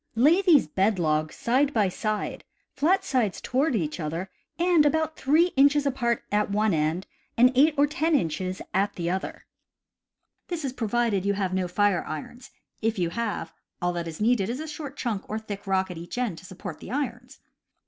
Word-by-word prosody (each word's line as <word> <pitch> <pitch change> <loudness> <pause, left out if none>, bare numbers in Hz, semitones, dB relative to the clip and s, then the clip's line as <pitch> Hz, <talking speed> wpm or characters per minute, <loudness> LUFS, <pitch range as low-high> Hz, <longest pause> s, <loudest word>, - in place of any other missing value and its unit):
Lay 300 - +5
these 340 -8 +5
bed 195 +6 +1
logs 155 -2 0
side 270 +4 +1
by 210 -3 +3
side, 215 +3 -3 0.3
flat 370 +7 +2
sides 245 - 0
toward 270 +1 0
each 160 -5 -2
other, 165 +4 -4 0.3
and 345 -2 +4
about 315 +1 +1
3 315 +6 +3
inches 285 +1 +4
apart 240 -4 0
at 210 0 +1
one 210 0 +2
end 160 +4 0 0.3
and 250 +2 +6
8 295 +4 +4
or 285 - +5
10 310 +2 +1
inches 185 - -1
at 200 +2 +1
the 170 -1 -2
other. 190 +2 -4 1.0
(This 335 -4 -3
is 260 - -3
provided 230 -4 0
you 200 0 +1
have 190 -2 -2
no 185 -1 0
fire 200 0 +2
irons; 240 - -7 0.3
if 225 0 0
you 175 -2 0
have, 230 0 -3 0.3
all 175 -1 0
that 170 -1 -3
is 160 -1 -7
needed 215 -2 +2
is 245 +3 -3
a 315 - -5
short 295 -2 -7
chunk 220 -7 -3
or 215 - -2
thick 205 -2 -7
rock 190 -1 +1
at 170 - -7
each 175 +7 -8
end 235 -10 -1
to - - -15
support 185 0 -8
the - - -10
irons.) 250 -1 -4
220 Hz, 190 wpm, -26 LUFS, 185-275 Hz, 1.0 s, and